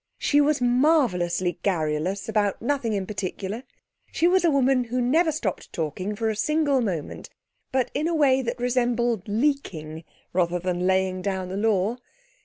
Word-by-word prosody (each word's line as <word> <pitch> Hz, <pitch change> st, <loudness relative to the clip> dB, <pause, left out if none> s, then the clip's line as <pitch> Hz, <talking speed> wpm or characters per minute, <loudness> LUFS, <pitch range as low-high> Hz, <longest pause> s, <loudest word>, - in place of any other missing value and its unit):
She 290 Hz, 0 st, +3 dB
was 290 Hz, -1 st, +2 dB
marvellously 240 Hz, -, +2 dB
garrulous 175 Hz, +1 st, -1 dB
about 210 Hz, -3 st, 0 dB
nothing 240 Hz, -2 st, -1 dB
in 195 Hz, -2 st, -1 dB
particular. 195 Hz, +2 st, -4 dB, 0.5 s
She 335 Hz, -, +2 dB
was 370 Hz, 0 st, +3 dB
a 340 Hz, -, +4 dB
woman 265 Hz, -3 st, +2 dB
who 245 Hz, +2 st, -2 dB
never 315 Hz, +7 st, +3 dB
stopped 225 Hz, -, -4 dB
talking 185 Hz, +6 st, -3 dB
for 225 Hz, +2 st, -1 dB
a -, -, -4 dB
single 285 Hz, +3 st, +1 dB
moment, 180 Hz, -10 st, -4 dB, 0.4 s
but 260 Hz, -2 st, 0 dB
in 300 Hz, +3 st, 0 dB
a 340 Hz, -, 0 dB
way 270 Hz, -4 st, +4 dB
that 240 Hz, -1 st, -4 dB
resembled 240 Hz, -3 st, 0 dB
leaking 205 Hz, -, -2 dB, 0.3 s
rather 175 Hz, -1 st, +1 dB
than 180 Hz, 0 st, -1 dB
laying 190 Hz, 0 st, +1 dB
down 190 Hz, -1 st, -3 dB
the 190 Hz, -, -4 dB
law. 210 Hz, +1 st, +1 dB
225 Hz, 160 wpm, -25 LUFS, 185-265 Hz, 0.5 s, a